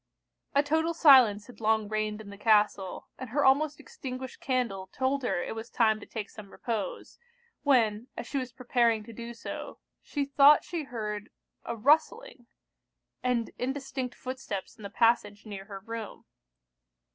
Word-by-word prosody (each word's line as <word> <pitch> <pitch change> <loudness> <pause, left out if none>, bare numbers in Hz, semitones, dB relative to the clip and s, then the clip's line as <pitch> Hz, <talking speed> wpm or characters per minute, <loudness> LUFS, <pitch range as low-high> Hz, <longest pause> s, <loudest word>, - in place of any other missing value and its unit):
A 285 - +5
total 320 +3 +1
silence 250 -10 +7
had 240 -3 -14
long 220 -1 +2
reigned 215 0 -2
in 200 -2 -10
the - - -9
castle, 210 -3 +2
and 255 - -6
her 285 +5 +1
almost 290 +2 +3
extinguished 260 - -7
candle 235 -8 -1
told 265 +7 -1
her 210 -8 -1
it - - -4
was 225 +2 -7
time 220 -2 +2
to - - -12
take 220 -2 -5
some 210 -5 -11
repose, 225 -2 -5 0.4
when, 235 -5 +2
as - - -4
she 275 - -2
was 255 -1 -5
preparing 235 -3 +1
to 230 - -11
do 235 +1 -7
so, 230 - -7 0.2
she 285 -2 -2
thought 280 +1 +6
she 335 -4 -4
heard 215 -4 -5 0.4
a 235 - -3
rustling, 305 - +1 0.7
and 245 -2 0
indistinct 265 -1 -3
footsteps 255 -7 -6
in 225 - -16
the 200 - -6
passage 220 -2 +2
near 200 -2 -7
her 195 -1 -8
room. 225 0 -7
235 Hz, 160 wpm, -29 LUFS, 215-265 Hz, 0.7 s, silence